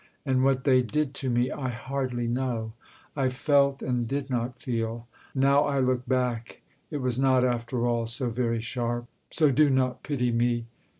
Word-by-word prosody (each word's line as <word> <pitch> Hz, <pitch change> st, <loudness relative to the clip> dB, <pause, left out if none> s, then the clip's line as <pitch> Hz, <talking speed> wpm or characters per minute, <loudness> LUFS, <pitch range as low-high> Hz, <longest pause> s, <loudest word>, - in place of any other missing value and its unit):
And 130 Hz, -2 st, +2 dB
what 135 Hz, -1 st, +2 dB
they 130 Hz, -2 st, +5 dB
did 145 Hz, +3 st, -1 dB
to 130 Hz, -, -1 dB
me 120 Hz, +1 st, +1 dB
I 130 Hz, -3 st, -3 dB
hardly 125 Hz, 0 st, -3 dB
know; 120 Hz, -3 st, -2 dB, 0.4 s
I 135 Hz, -3 st, +1 dB
felt, 140 Hz, +1 st, +2 dB
and 125 Hz, -2 st, -1 dB
did 135 Hz, +1 st, -3 dB
not 120 Hz, 0 st, -2 dB
feel. 115 Hz, -1 st, -3 dB, 0.3 s
Now 140 Hz, +2 st, +4 dB
I 140 Hz, -1 st, 0 dB
look 125 Hz, -1 st, +1 dB
back, 125 Hz, -2 st, -1 dB, 0.3 s
It 150 Hz, -3 st, -3 dB
was 125 Hz, -1 st, 0 dB
not 130 Hz, -1 st, +4 dB
after 120 Hz, 0 st, 0 dB
all 120 Hz, -1 st, 0 dB
so 120 Hz, +1 st, -2 dB
very 115 Hz, -1 st, 0 dB
sharp: 120 Hz, 0 st, -2 dB, 0.2 s
So 155 Hz, -3 st, +3 dB
do 145 Hz, +3 st, +4 dB
not 130 Hz, -2 st, +1 dB
pity 125 Hz, -4 st, -1 dB
me. 120 Hz, 0 st, +1 dB
125 Hz, 175 wpm, -27 LUFS, 120-135 Hz, 0.4 s, they